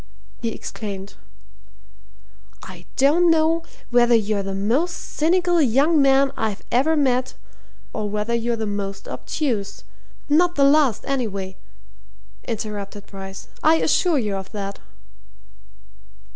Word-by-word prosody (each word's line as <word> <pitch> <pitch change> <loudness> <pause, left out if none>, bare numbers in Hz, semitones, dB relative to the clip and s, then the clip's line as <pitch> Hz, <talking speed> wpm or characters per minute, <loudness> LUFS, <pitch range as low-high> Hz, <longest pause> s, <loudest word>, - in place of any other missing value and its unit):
he 230 - -1
exclaimed. 200 -3 -7 1.5
"I 180 -1 -11
don't 310 +6 +4
know 325 +1 +3 0.3
whether 240 0 +5
you're 210 -2 +1
the 195 0 -4
most 250 - +1
cynical 350 +2 +1
young 285 +5 +3
man 275 0 +4
I 215 -3 -1
ever 280 +7 +3
met, 255 -3 +1 0.6
or 210 -1 -3
whether 210 +3 -2
you're 235 0 0
the 220 -1 -3
most 200 -1 -4
obtuse 235 -10 -3 0.2
" - - -30
"Not 345 +4 +3
the 280 - +3
last, 275 -5 +4
anyway," 200 -8 -2 0.9
interrupted 205 -2 -5
Bryce. 195 -1 -9
"I 315 +1 +5
assure 325 +1 +2
you 210 -6 -1
of 190 0 -8
that!" 200 -1 -5
235 Hz, 120 wpm, -22 LUFS, 205-295 Hz, 1.5 s, whether